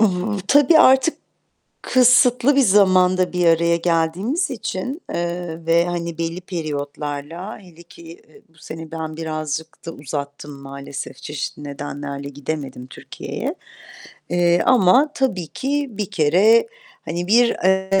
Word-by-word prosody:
I 225 - +6
hı. 195 +2 -1
Tabii, 290 +3 +5
artık 265 +2 +5 0.7
kısıtlı 250 +1 +4
bir - - +5
zamanda 185 -4 +4
bir 180 -1 +1
araya 170 0 +3
geldiğimiz 175 - 0
için, 255 - -5
eee, 170 -1 -4
ve, 165 +1 +3
hani, 170 -2 -4
belli 165 +1 -3
periyotlarla, 150 +1 -5
hele 175 -4 -16
ki, 170 - -16
eee, 165 -1 -15
bu 165 0 -28
sene 160 0 -9
ben 160 -1 -6
birazcık 155 0 -5
da - - -3
uzattım 145 0 -6
maalesef. 140 0 -8
Çeşitli 150 0 -6
nedenlerle 140 0 -6
gidemedim 140 -2 -6
Türkiye'ye, - - -6 0.7
eee 175 0 +2
,ama 255 +5 +5
tabii 190 -11 -1
ki 280 - -2
bir 205 -2 -4
kere, 190 - +4 0.4
hani, 175 +2 -4
bir, 235 +4 +5 0.2
eee, 190 +1 +2
170 Hz, 130 wpm, -20 LUFS, 155-205 Hz, 0.7 s, I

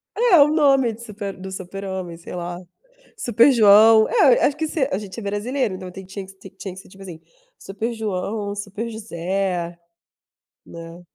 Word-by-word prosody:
É 440 -8 +5
o 285 - +7
nome 275 -6 +3
de 230 - -13
super 200 -3 -7
do 190 0 -8
super 190 +1 -7
homem, 185 -3 -5
sei 170 - -9
lá. 175 0 -5 0.6
"Super 240 +3 +4
João", 220 0 +6
eh, - - +4
acho 285 - -1
que 315 - -2
se 290 -3 -1
a - - 0
gente 205 +2 -8
é - - -9
brasileiro, 210 +3 -2
então 185 0 -8
tinha 190 +1 -10 0.2
que 190 - -14
s 195 - -29 0.2
tinha 190 -2 -7
que 190 - -11
ser, - - -17
tipo 195 +1 -15
assim, 175 -4 -10 0.4
"Super 220 +5 -5
João, 205 -1 -3
Super 205 +3 -5
José", 185 -4 -3 0.9
né. 165 +1 -11
200 Hz, 185 wpm, -21 LUFS, 185-235 Hz, 0.9 s, o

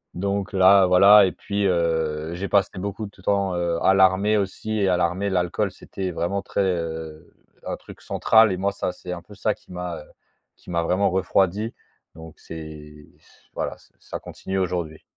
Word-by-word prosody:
donc, 100 +2 -2
là, 95 +1 +6
voilà 100 +3 +7
et - - -3
puis, 100 0 -2
heu, 80 -2 0
j'ai 95 +3 -4
passé 100 -1 +2
beaucoup 100 +3 -4
de 100 -1 -14
temps, 100 -1 0
heu, 85 -1 0
à 95 - +6
l'armée 95 +3 +4
aussi. 105 +2 -2
Et 95 -1 +2
à 90 - +2
l'armée, 90 +3 0
l'alcool, 95 +3 0
c'était 95 0 -6
vraiment 90 +4 -2
très, 100 - -2
heu, 80 -4 -4 0.4
un - - -3
truc - - -14
central 110 -2 +4
et 90 - -2
moi, 100 +1 0
ça, 100 - -3
c'est 90 0 -9
un 85 - -7
peu 105 - -14
ça - - 0
qui - - -20
m'a, 90 -2 -5
heu, - - -14 0.5
qui - - -17
m'a 85 -1 +1
vraiment 95 +3 +2
refroidi. 95 +3 +1 0.4
Donc, 80 0 -12
c'est 75 -2 -10
s - - -26
voilà - - -4
ç - - -24
ça - - -7
continue 95 0 -6
aujourd'hui. 85 -4 -3
95 Hz, 190 wpm, -23 LUFS, 85-100 Hz, 0.5 s, voilà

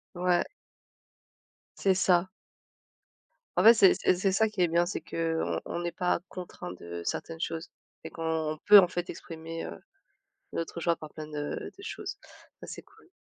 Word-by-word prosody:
Ouais. 175 0 +2 1.4
C'est 195 - +4
ça. 180 -1 +3 1.3
En - - +4
fait 230 +2 +10
c'est 195 -4 +6
c'est - - +2
c'est 190 +2 +1
ça 220 +3 +3
qui 210 -3 -3
est 175 - +5
bien, 170 +1 +2
c'est - - -4
qu'on 165 -1 -1
on - - -4
n'est 175 0 -2
pas 180 -1 0
contraints 175 - -7
de 85 -1 -8
certaines 165 - -4
choses 165 +1 -4 0.3
et 160 - -7
qu'on 160 -2 -2
peut 205 0 +10
en 185 - +8
fait 175 0 -4
exprimer, 165 0 -7
heu, - - -8 0.8
notre 165 0 -4
joie 170 0 +1
par 155 -2 -10
plein 155 -1 -7
de 145 -1 -4 0.2
de 395 - -13
choses. 405 -1 -6 0.5
Ça - - -7
c'est - - -7
cool. - - -23
170 Hz, 170 wpm, -29 LUFS, 160-185 Hz, 1.4 s, fait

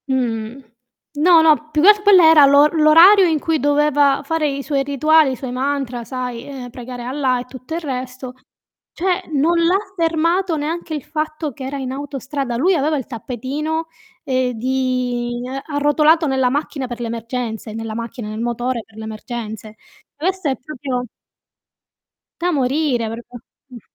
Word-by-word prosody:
Mhmm, 245 -1 -2 0.6
no, 335 +1 +6
no, 305 -1 +3
più 305 - +1
che 395 - +8
al 420 0 +5
quello 405 -3 +6
era 320 -3 +8
l'o 280 +1 +6
l'orario 330 +6 +6
in 320 -2 +1
cui 320 +1 0
doveva 290 0 +2
fare 315 +1 0
i 275 -1 -3
suoi 280 -2 0
rituali, 295 +1 +3
i - - -3
suoi 255 0 -6
mantra, 260 -2 -2
sai, 250 -1 -5
ehm, 265 -3 -8
pregare 245 0 -8
Allah 255 0 0
e 245 - -6
tutto 255 +4 -8
il 340 - -3
resto. 255 -3 -6 0.6
Cioè, 360 0 -1
non 315 +5 +2
l'ha 335 +3 +3 0.2
fermato 335 +1 +1
neanche 320 +2 -4
il 295 -4 -4
fatto 310 -1 -4
che 265 - -9
era 275 +2 -4
in 260 -2 -4
autostrada. 275 -2 -4
Lui 355 +10 +3
aveva 305 0 +1
il 260 - -4
tappetino, 280 +7 -4 0.4
ehm, 255 -3 0
di 245 -1 -2
ehm, 265 +2 -5
arrotolato 305 +3 +3
nella 265 -2 +1
macchina 280 0 -3
per 240 -1 -7
le 240 - -3
emergenze, 230 -1 -5
nella 225 0 -5
macchina, 230 -1 -6
nel 215 +1 -5
motore 240 0 -2
per 220 - -21
le 220 - -7
emergenze. 220 -1 -7 0.4
Questo 365 +1 -1
è 265 - -1
proprio 255 -2 -5 1.4
Da 355 +1 +1
morire, 270 -4 0
proprio, 235 +2 -9 0.3
mh. 245 -3 -11
275 Hz, 165 wpm, -19 LUFS, 245-310 Hz, 1.4 s, che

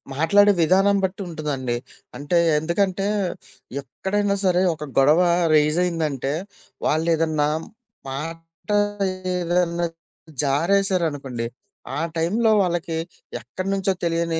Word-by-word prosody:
మాట్లాడే 205 +7 +5
విధానం 195 +4 +4
బట్టి 190 +2 -1
ఉంటదండి. 145 -7 -3 0.4
అంటే 145 +4 0 0.2
ఎందుకంటే 190 +4 0 0.7
ఎక్కడైనా 200 +9 -1
సరే 180 -1 +3
ఒక 150 -1 -8
గొడవ 150 +6 +5 0.3
రైజ్ 150 +2 +4
అయిందంటే 155 -6 -1 0.5
వాళ్ళేదన్నా 160 -1 +1 0.6
మాట 165 +6 -8 0.6
ఏదన్నా 175 -1 0 0.6
జారేశారనుకోండి, 155 -5 0 0.5
ఆ - - -1 0.2
టైంలో 210 +8 +2
వాళ్ళకి 170 -3 -1 0.4
ఎక్కడినుంచో 195 0 -1
తెలియని 165 -1 0
165 Hz, 90 wpm, -23 LUFS, 150-185 Hz, 0.7 s, మాట్లాడే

